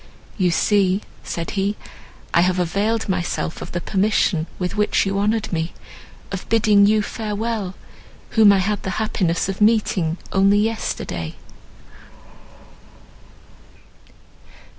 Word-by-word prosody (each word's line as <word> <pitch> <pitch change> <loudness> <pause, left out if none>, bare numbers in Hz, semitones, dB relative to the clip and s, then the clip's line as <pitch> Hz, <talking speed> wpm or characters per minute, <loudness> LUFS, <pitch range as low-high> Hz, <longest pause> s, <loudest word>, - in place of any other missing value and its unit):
"You 185 -4 +2
see," 195 +2 +2 0.2
said 170 -1 -4
he, 200 +1 -1 0.6
"I 170 - +5
have 185 +1 +2
availed 205 +6 0
myself 180 -3 -2
of - - -7
the 175 - -2
permission 190 -4 +1
with 180 0 -3
which 210 -1 +2
you 195 0 -1
honoured 215 0 0
me—of 170 +3 -7
bidding 210 -3 +5
you 215 0 +3
farewell, 210 -3 -3 0.6
whom 220 -3 +6
I 200 - +4
had 200 +2 -1
the - - -4
happiness 185 -6 0
of 195 +1 -4
meeting 205 -6 +2
only 195 +1 +4
yesterday." 205 - -2
200 Hz, 115 wpm, -21 LUFS, 180-215 Hz, 0.6 s, whom